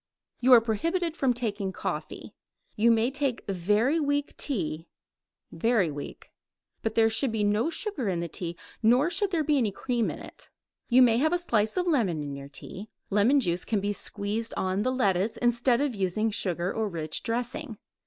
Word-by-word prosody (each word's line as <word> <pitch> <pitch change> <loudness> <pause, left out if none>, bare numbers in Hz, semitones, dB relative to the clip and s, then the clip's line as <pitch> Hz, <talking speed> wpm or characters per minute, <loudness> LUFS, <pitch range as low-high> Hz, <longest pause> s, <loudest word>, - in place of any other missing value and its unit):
You 255 +2 +3
are 235 - +9
prohibited 330 - -1
from 270 -5 +2
taking 210 -5 -2
coffee. - - -5 0.4
You 230 +2 +3
may 230 +2 +3
take 275 -3 -1
very 210 - +1
weak 285 -1 -1
tea 165 - -2 0.6
very 195 -1 +1
weak 145 0 -8 0.5
but 220 -1 -2
there 225 -1 +5
should 225 +3 0
be 220 -1 -1
no 210 +8 +2
sugar 335 - -2
in 175 -2 -1
the 170 - -2
tea, 170 +1 -5 0.2
nor 250 +9 +4
should 390 +3 +1
there 335 -4 0
be 295 -1 +2
any 225 -4 +1
cream 240 +3 -1
in - - -5
it. - - -11 0.4
You 255 +1 +7
may 235 -1 +4
have 315 +4 +2
a - - +3
slice 220 - 0
of 360 - +1
lemon 215 - +1
in 140 -1 -5
your 140 0 -9
tea. 190 +8 -8 0.2
Lemon 220 +8 +4
juice 175 -7 0
can 215 - 0
be 205 +1 -1
squeezed 210 +3 -3
on 190 +1 0
the 255 - +1
lettuce 205 -4 +1
instead 240 +1 +2
of 285 -3 0
using 205 +2 0
sugar 180 -3 -1
or 220 -1 -1
rich 155 -4 -4
dressing. 240 +1 -3
225 Hz, 185 wpm, -27 LUFS, 195-260 Hz, 0.6 s, are